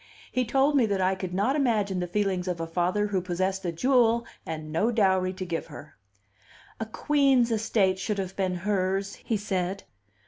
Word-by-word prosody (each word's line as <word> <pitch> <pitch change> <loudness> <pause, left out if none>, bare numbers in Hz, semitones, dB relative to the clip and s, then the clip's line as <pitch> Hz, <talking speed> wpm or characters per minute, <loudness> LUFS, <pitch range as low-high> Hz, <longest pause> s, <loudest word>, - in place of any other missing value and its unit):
He 255 0 0
told 270 +5 +2
me 250 -5 +4
that 200 -2 0
I 185 0 +2
could 185 -1 -5
not 205 +9 +1
imagine 215 -9 +1
the 180 - -2
feelings 190 -1 -1
of 180 -2 -2
a 165 - -2
father 180 +5 0
who 200 -3 -1
possessed 185 +2 -2
a 175 - 0
jewel 235 +4 +3 0.2
and 155 -1 -5
no 210 +8 +2
dowry 190 -4 +2
to 185 0 -5
give 170 -2 -3
her. 150 -1 -11 0.8
"A 225 - -3
queen's 270 -1 +2
estate 210 -4 +1
should 205 +2 -2
have 190 -1 -4
been 185 -2 -1
hers," 195 +1 -1
he 225 - -2
said. 190 -1 -2
195 Hz, 185 wpm, -27 LUFS, 185-225 Hz, 0.8 s, me